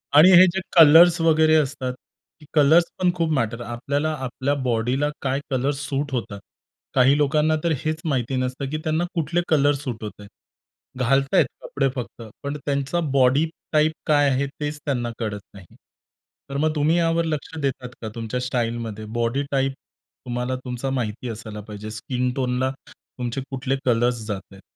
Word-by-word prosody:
आणि 160 +5 +9
हे 185 - +9
जे 190 - -1 0.2
कलर्स 165 +2 +8
वगैरे 160 -1 +4
असतात, 135 -4 0 0.6
कलर्स 155 +3 +6 0.2
पण 180 -1 +3
खूप 165 -2 0
मॅटर 115 -3 -1
आपल्याला 140 +6 -2
आपल्या 130 +3 -1
बॉडीला 125 +5 +1
काय 135 0 0
कलर्स 135 +2 0
सूट 145 0 -2
होतात. 105 -5 -3 0.5
काही 135 +2 +5
लोकांना 150 +2 +2
तर 170 - +1
हेच 155 +1 -2
माहिती 130 -3 -1
नसतं, 130 +2 -2
की 155 - -2
त्यांना 160 +2 0
कुठले 170 +2 0
कलर 145 -2 +4
सूट 125 -6 -6
होतायत. 105 -1 -8 0.7
घालतायत 135 +2 +3 0.2
कपडे 135 -1 -1
फक्त 120 -1 -6 0.2
पण 140 +1 -3
त्यांचा 140 +4 -1
बॉडी 135 +3 +4 0.3
टाइप 155 +1 +4 0.2
काय 145 -2 +4
आहे, 135 +1 0
तेच 150 0 -3
त्यांना 120 -4 -1
कळत 105 -3 -3
नाही. 95 -3 -13 0.8
तर 140 - -3
मग 155 +1 +1
तुम्ही 155 +3 +2
यावर 165 0 +2
लक्ष 160 0 -4
देतात 130 -2 -2
का? 110 - -4
तुमच्या 115 +2 -3
स्टाईलमध्ये 115 -3 -3
बॉडी 120 +5 0
टाइप 135 0 +1 0.5
तुम्हाला 125 +1 -2
तुमचा 125 +2 -3
माहिती 120 -2 -3
असायला 110 -1 -7
पाहिजे. 105 0 -7
स्किन 125 +3 -2
टोनला 130 0 0 0.2
तुमचे 125 +1 -6
कुठले 135 0 -2
कलर्स 120 -2 +1
जाता 100 -3 -5
आहेत? 95 - -15
135 Hz, 160 wpm, -23 LUFS, 120-150 Hz, 0.8 s, आणि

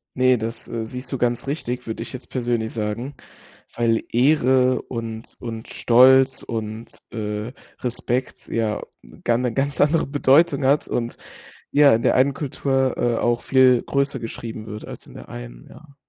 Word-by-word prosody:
Ne, 130 -1 +4
das, 115 +1 -5
äh, 115 -1 -4
siehst 125 +3 -7
du - - 0
ganz 120 +1 0
richtig, 125 -4 -3
würde 110 - -4
ich - - -8
jetzt 130 -1 -9
persönlich 120 -3 -1
sagen, 115 +5 -3 0.6
weil 115 -1 +1
Ehre 130 0 +3
und 115 -2 -7
und 115 -2 -7
Stolz 130 +2 +5
und, 110 0 -5 0.2
äh, 105 +1 -4 0.3
Respekt 125 +1 -2
ja 110 -2 -1 0.2
'ne - - -17
gan 120 0 +2
'ne 125 -2 -1
ganz 140 +2 -1
andere 150 +3 +3
Bedeutung 140 +1 +3
hat 140 +3 +2
und, 120 -1 -2 0.6
ja, 145 -1 +6
in 115 - +2
der - - +3
einen 135 +2 +3
Kultur, 135 -2 -1
äh, 120 -1 +1
auch 120 0 +1
viel 130 -2 +4
größer 140 -1 -1
geschrieben 115 -1 -7
wird 105 0 -7
als - - -10
in - - -14
der - - -11
einen, - - -9
ja. 145 -3 -16
125 Hz, 170 wpm, -22 LUFS, 115-135 Hz, 0.6 s, ja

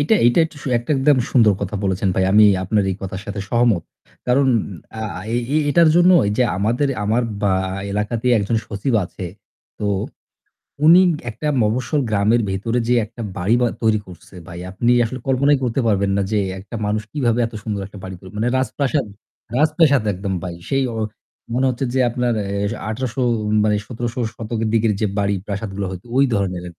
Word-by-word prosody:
এইটা 145 +10 +3
এইটা 120 +5 +4
একটু, 160 -1 -8 0.2
একটা 120 - -8
একদম 135 0 +4
সুন্দর 115 -5 +5
কথা 100 +1 -3
বলেছেন 95 +1 0
ভাই। 95 - +2
আমি 105 +1 +7 0.2
আপনার 105 +2 +1
এই 95 - -3
কথার 95 0 -5
সাথে 100 -1 -4
সহমত। 120 -7 +2 0.4
কারণ 130 +3 +3 0.5
আ - - -4 0.3
এ 120 +4 -1
এটার 170 +2 +5
জন্য 175 +1 +6 0.2
এইযে 105 +5 +1
আমাদের 115 +8 +1 0.2
আমার 110 +4 +1 0.2
বা 100 - +3 0.4
এলাকাতে 110 +3 -2
একজন 105 +3 0
সচিব 105 +5 -2
আছে। 90 - -8 0.5
তো 105 - -4 1.0
উনি 170 +3 +8 0.3
একটা 115 +7 -4
মফস্বল 125 +7 0
গ্রামের 105 +3 +2
ভেতরে 110 +5 -1
যে 120 - +3
একটা 115 +3 -11 0.2
বাড়িবা 115 +7 +2
তৈরি 110 -2 +3
করছে 90 +1 -14
ভাই। 85 0 -8
আপনি 120 +5 +1
আসলে 130 +3 -4
কল্পনাই 140 +2 +3
করতে 125 +1 0
পারবেন 100 -2 +1
না - - +2
যে 105 - +2 0.2
একটা 100 +4 -9
মানুষ 105 +1 0
কিভাবে 125 -5 0
এত 115 - -8
সুন্দর 105 -2 -3
একটা 100 0 -12
বাড়ি 95 0 -6
করে। 95 - -12
মানে 115 +3 0
রাজপ্রাসাদ 135 +2 0 0.5
রাজপ্রাসাদ 150 -3 +3
একদম 95 +1 -4
ভাই। 90 -2 -5
সেই 135 0 +1
ও - - -6 0.6
মনে 130 +2 +1
হচ্ছে 130 +2 -2
যে 130 - +1
আপনার 120 0 0
এ - - -5 0.4
১৮০০ 120 +2 -3 0.5
মানে 105 -1 +2
১৭০০ 120 +1 -4 0.2
শতকের 115 0 -3
দিকের 115 -1 +3
যে - - +3
বাড়ি 100 0 +1
প্রাসাদগুলো 100 -1 -4
হয়তো 95 +2 -8
ওই 140 - +6
ধরনের। 90 -3 -2
115 Hz, 175 wpm, -20 LUFS, 100-130 Hz, 1.0 s, উনি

